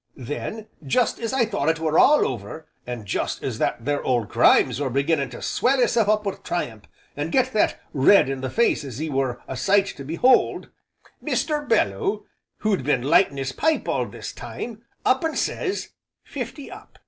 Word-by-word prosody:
Then 145 - -5 0.2
jest 225 - +1
as 230 -1 -3
I 260 -3 +2
thought 200 -9 -1
it 160 - +1
were 160 -1 +2
all 300 +1 +5
over, 125 +6 -6 0.2
an' 120 -4 -5
jest 95 - -3
as - - -3
that 115 - -1
there 145 0 0
Old 120 -5 0
Grimes - - +4
were 140 - 0
beginning 140 +1 0
to 120 - -9
swell 265 +2 +1
hisself 235 -3 +2
up 215 0 +2
wi' 200 - -2
triumph, 110 -11 -4 0.3
an' 145 +2 -3
get 260 +5 +1
that 215 - +1
red 145 +7 +5
in 135 -1 -3
the 130 - -3
face 235 - +1
as 130 -3 -7
'e 155 0 -3
were 130 -3 -1
a 135 - -5
sight 195 +7 +3
to 140 - -8
behold, 170 - +2 0.5
Mr. 300 -2 -1
Belloo, 405 -3 +1 0.4
who'd 205 -9 0
been 130 -3 +1
lightin' 145 +1 +3
'is 135 0 -2
pipe 315 - 0
all - - 0
this - - -8
time, 230 -2 -7 0.2
up 260 +3 +3
and 320 -1 -1
sez, 390 +1 -2 0.3
'Fifty 270 +1 -7
up!' - - -13
160 Hz, 185 wpm, -23 LUFS, -, 0.5 s, all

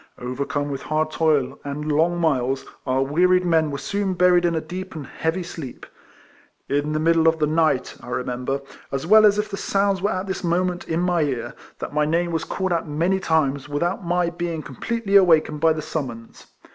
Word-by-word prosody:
Overcome 140 +3 -3
with 135 - -4
hard 155 +1 -1
toil, 150 -5 +1
and 150 +2 -3
long 165 +4 +2
miles, 135 -5 0 0.2
our 130 +1 +2
wearied 180 +6 +3
men 160 -3 +2
were 140 - -4
soon 195 +6 -2
buried 180 -1 +4
in 170 -1 +1
a - - +1
deep 180 +3 -7
and 150 -3 -6
heavy 160 +6 -2
sleep. 155 -7 -8 0.8
In 145 +2 0
the 155 - 0
middle 165 0 +3
of 160 0 +4
the 155 - +2
night 155 -4 +1
I - - -12
remember, 125 +2 -3 0.3
as 135 +2 -2
well 215 +4 +7
as 205 0 +3
if 210 0 0
the 195 - -3
sounds 195 -1 0
were 200 - +1
at 185 -1 -2
this 190 -1 -4
moment 180 +1 0
in 165 +1 0
my 175 -2 +1
ear, 125 -5 -2 0.2
that - - -6
my 150 0 +2
name 170 +3 0
was 165 -2 -2
called 190 -2 -2
out 165 -1 -1
many 170 +6 0
times 145 -5 0
without 170 +7 -1
my 175 0 0
being 170 -2 -4
completely 200 - -3
awakened 160 -5 +4
by 165 - +5
the 155 -1 -2
summons. 120 -7 -6
160 Hz, 200 wpm, -23 LUFS, 145-180 Hz, 0.8 s, well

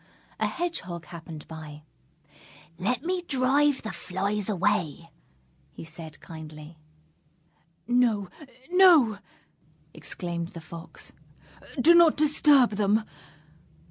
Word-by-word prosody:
A - - +1
Hedgehog 185 - -4
happened 165 -2 -10
by. 155 -2 -10 1.0
"Let 245 +7 -1
me 360 +1 -1
drive 280 -1 +1
the 220 - -4
flies 200 +3 -3
away," 180 -5 -1 0.6
he - - -9
said 165 -1 -10
kindly. 155 0 -11 1.1
"No, 235 -5 +2 0.4
no!" 335 - +6 0.7
exclaimed 170 -2 -5
the - - -5
Fox, 165 +1 -10 0.7
"do 325 +7 +7
not 340 -2 +6
disturb 290 -4 +4
them! 210 +1 +2
205 Hz, 95 wpm, -27 LUFS, 165-275 Hz, 1.1 s, do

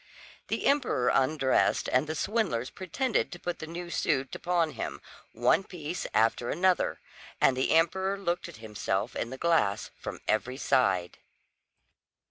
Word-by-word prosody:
The - - -2
emperor 255 - +2
undressed, 135 0 +2
and 130 +4 +2
the 155 - -3
swindlers 185 - -1
pretended 225 +7 -1
to 175 - -8
put 175 -1 -4
the 160 - -6
new 170 +1 -6
suit 135 -5 0
upon 170 -3 0
him, - - -5 0.3
one 120 - +3
piece 175 -2 -5
after 115 +2 +2
another; 185 0 +1 0.4
and 130 - +4
the 130 - 0
emperor 190 +4 +2
looked 175 -3 -2
at - - -11
himself 105 -1 -3
in 115 - -2
the 130 - -7
glass 145 -12 +1
from - - -6
every 125 +4 0
side. 95 -11 +1
155 Hz, 145 wpm, -29 LUFS, 125-175 Hz, 0.4 s, and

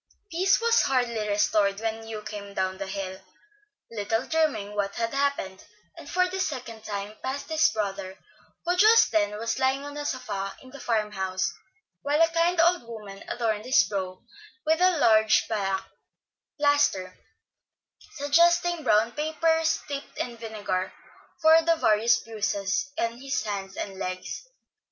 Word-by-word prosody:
Peace 375 +4 +3
was 465 0 +4
hardly 235 -5 0
restored 205 -1 +2
when 225 0 -3
Hugh 215 -1 -6
came 200 -1 -8
down 190 0 -1
the 195 - -4
hill, 190 -1 -5 0.7
little 225 +2 -1
dreaming 300 -11 0
what 200 -1 -1
had 230 +1 -2
happened, 275 -9 -1 0.3
and 285 - -11
for 365 0 +2
the 375 +1 -5
second 250 -9 -4
time 205 0 -5
passed 270 +4 -4
his 315 0 +4
brother, 195 -3 -4 0.5
who 355 +1 +2
just 435 +4 +6
then 210 -1 +1
was 230 +3 -2
lying 265 +1 +1
on 290 0 -8
a 295 - -3
sofa 200 -8 -4
in 260 - -14
the 280 - -11
farm 220 -4 0
house, 190 -2 -2 0.5
while 290 +2 +1
a 330 0 +5
kind 335 +1 +1
old 345 +2 +4
woman 210 -4 -9
adorned 220 -3 -1
his 255 - +5
brow 185 -2 -4 0.5
with 320 +2 +2
a 365 -2 +4
large 220 -5 +4
black 195 -3 -2 0.7
plaster, 285 -11 +2 1.0
suggesting 340 +3 +3
brown 215 0 +3
paper 320 +2 +1
steeped 290 -3 -3
in 240 -1 -3
vinegar, 210 -5 -3 0.5
for 320 +1 +7
the 330 0 +3
various 225 -5 +3
bruises 210 +2 -2
on 230 -3 -2
his 275 0 -2
arms 195 -2 -5
and 195 -1 -5
legs. 185 - -5
230 Hz, 150 wpm, -26 LUFS, 200-295 Hz, 1.0 s, for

